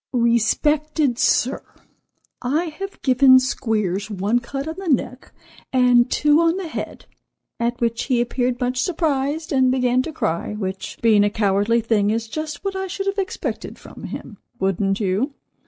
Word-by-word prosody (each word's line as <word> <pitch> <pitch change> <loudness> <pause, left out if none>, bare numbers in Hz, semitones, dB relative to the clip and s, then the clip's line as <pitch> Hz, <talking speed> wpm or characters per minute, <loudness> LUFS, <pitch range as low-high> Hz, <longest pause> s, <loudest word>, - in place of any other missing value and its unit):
"Respected 260 +4 +1
Sir: 255 +2 +2 0.8
I 305 +6 -1
have 390 0 -6
given 260 0 +6
Squeers 215 -6 -1
one 205 +4 0
cut 275 +4 -5
on 320 - -3
the 390 - -6
neck, 255 -3 -1 0.4
and 250 -2 +4
two 300 +3 +3
on 335 +2 +2
the 380 -3 -4
head, 315 - -6 0.5
at 235 +1 -1
which 230 -1 -1
he 255 -3 +1
appeared 245 +1 -1
much 250 0 -1
surprised, 310 -1 -1
and 260 -2 +3
began 255 -1 +2
to 315 - -5
cry, 170 - -2
which, 190 -2 -5
being 215 -3 +5
a 205 - +3
cowardly 205 +2 +1
thing, 215 -2 +1
is 225 +1 -1
just 310 - -6
what 390 -1 -2
I 380 0 -3
should 390 +2 -4
have 395 +1 -1
expected 380 - -4
from - - -11
him—wouldn't 195 -2 -3
you? 215 +8 -1
250 Hz, 155 wpm, -21 LUFS, 220-300 Hz, 0.8 s, given